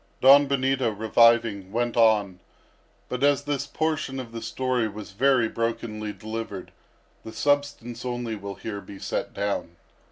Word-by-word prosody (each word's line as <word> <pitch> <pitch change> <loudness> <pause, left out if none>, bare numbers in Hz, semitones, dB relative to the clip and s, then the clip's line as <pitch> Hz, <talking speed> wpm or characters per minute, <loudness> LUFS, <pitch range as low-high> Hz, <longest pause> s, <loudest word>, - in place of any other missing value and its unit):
Don 140 +2 +7
Benito 135 -2 +1
reviving, 110 -2 +3
went 120 +1 -1
on; 105 -5 +3 0.7
but 125 +1 -3
as 145 0 +3
this 140 -1 -2
portion 155 -3 -2
of 120 -3 -7
the 115 0 -6
story 130 -3 -1
was 105 -1 -8
very 125 +2 +3
brokenly 115 -2 -3
delivered, 110 -3 -6 0.5
the 110 - -8
substance 140 -3 -1
only 120 -2 -3
will 100 -1 -7
here 100 0 -6
be 100 - -11
set - - -3
down. 100 -4 -3
115 Hz, 140 wpm, -25 LUFS, 110-130 Hz, 0.7 s, Don